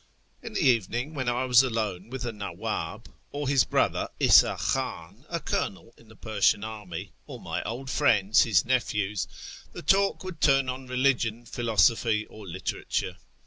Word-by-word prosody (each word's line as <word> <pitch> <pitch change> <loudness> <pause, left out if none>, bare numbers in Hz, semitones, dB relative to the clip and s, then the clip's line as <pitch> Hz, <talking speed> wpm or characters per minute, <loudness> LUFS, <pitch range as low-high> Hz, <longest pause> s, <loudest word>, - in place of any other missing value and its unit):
" - - -39
In - - -8
the - - -1
evening, 120 +4 +1
when 130 -4 -2
I 125 +2 0
was 125 -1 +6
alone 110 -6 -3
with 130 0 -5
the 120 - -2
Naww; 105 -2 -4
ib, - - -17 0.2
or 145 -1 -4
his 135 -1 +4
brother - - 0
'Isa - - +6
Khan, 100 - -3
a 170 - -2
colonel 115 -5 -3
in 115 - -21
the 110 - -16
Persian 105 -1 +1
army, 105 -6 -7 0.2
or - - -8
my - - -4
old 125 +4 -5
friends, 110 -7 +3
his 100 -9 +3
nephews, 105 -5 -1 0.5
the - - -8
talk 195 +6 +2
would 185 -4 -8
turn 135 -2 +4
on 130 +1 -5
religion, 125 -3 0
philosophy, 115 -1 +2
or 105 -2 -11
literature. 85 0 -3
115 Hz, 170 wpm, -27 LUFS, 105-130 Hz, 0.5 s, was